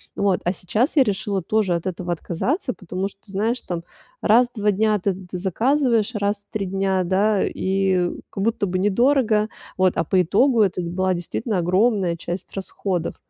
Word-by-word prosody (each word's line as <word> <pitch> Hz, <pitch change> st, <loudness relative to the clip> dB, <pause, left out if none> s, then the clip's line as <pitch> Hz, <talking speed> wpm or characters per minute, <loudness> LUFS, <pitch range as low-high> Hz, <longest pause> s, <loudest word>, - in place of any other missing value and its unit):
Вот. 200 Hz, -2 st, +1 dB
А 175 Hz, -, +1 dB
сейчас 220 Hz, -, -1 dB
я 280 Hz, -, +7 dB
решила 200 Hz, -3 st, -1 dB
тоже 205 Hz, +1 st, +1 dB
от 170 Hz, +2 st, -3 dB
этого 180 Hz, -1 st, -3 dB
отказаться, 250 Hz, -, -2 dB
потому 190 Hz, 0 st, -4 dB
что, 195 Hz, -, -21 dB
знаешь, 220 Hz, +5 st, -1 dB
там 170 Hz, -2 st, -5 dB, 0.4 s
раз 235 Hz, +3 st, +5 dB
в -, -, -18 dB
2 210 Hz, 0 st, +3 dB
дня 210 Hz, +1 st, +2 dB
ты 195 Hz, +1 st, 0 dB
ты 180 Hz, -1 st, -8 dB
заказываешь 230 Hz, -, +1 dB
раз 205 Hz, 0 st, -1 dB
в -, -, -55 dB
3 200 Hz, -3 st, -2 dB
дня, 190 Hz, 0 st, 0 dB
да, 195 Hz, +3 st, +2 dB
и 190 Hz, -2 st, 0 dB, 0.2 s
как 195 Hz, -, -4 dB
будто 220 Hz, -2 st, 0 dB
бы 185 Hz, 0 st, -1 dB
недорого. 220 Hz, +1 st, +2 dB, 0.3 s
Вот, 185 Hz, -1 st, +3 dB
а -, -, +2 dB
по 185 Hz, +3 st, +2 dB
итогу 225 Hz, -, +3 dB
это 190 Hz, -3 st, +2 dB
была 185 Hz, +2 st, 0 dB
действительно 195 Hz, +5 st, -3 dB
огромная 185 Hz, 0 st, +2 dB
часть 175 Hz, +2 st, -6 dB
расходов. 190 Hz, -2 st, -3 dB
195 Hz, 180 wpm, -22 LUFS, 185-215 Hz, 0.4 s, я